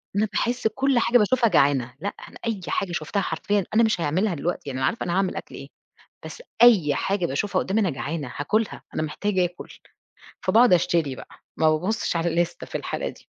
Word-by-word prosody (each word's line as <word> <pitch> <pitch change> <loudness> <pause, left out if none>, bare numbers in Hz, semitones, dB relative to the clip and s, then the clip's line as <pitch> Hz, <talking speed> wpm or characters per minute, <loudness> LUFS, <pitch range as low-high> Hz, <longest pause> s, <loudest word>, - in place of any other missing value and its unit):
أنا 210 - +2
باحس 240 +1 0
كل 270 +3 +1
حاجة 245 +1 +4
باشوفها 235 +2 +3
جعانة، 135 - +2
لأ 200 - -4 0.2
أنا - - -13
أي 220 -4 -2
حاجة 195 - -1
شُفتها 175 +4 -2
حرفيًا 200 +4 -1
أنا 230 - +5
مش 215 -6 +1
هيعملها 175 +5 0
دلوقتي، 175 +4 -2
يعني 130 -1 -4
أنا 130 - +1
عارفة 230 - -2
أنا 175 - -2
هاعمل 190 0 0
أكل - - -7
إيه، - - -9 0.6
بس - - -9 0.2
أي 190 -12 +6
حاجة 195 -3 0
باشوفها 170 +10 -1
قُدّامي 205 +4 0
أنا 190 -5 +1
جعانة، 145 0 -4
هاكلها، 215 +9 -1
أنا - - -1
محتاجة 185 +5 0
آكل. 175 0 -6 0.8
فبقعُد 240 0 +5
أشتري 165 -5 +2
بقى، - - -11 0.3
ما 155 -1 +4
بابُصِّش 180 +5 -1
على 165 +1 0
اللِستة 170 +1 -1
في - - -16
الحالة - - -3
دي. - - -13
180 Hz, 195 wpm, -24 LUFS, 155-215 Hz, 0.8 s, أي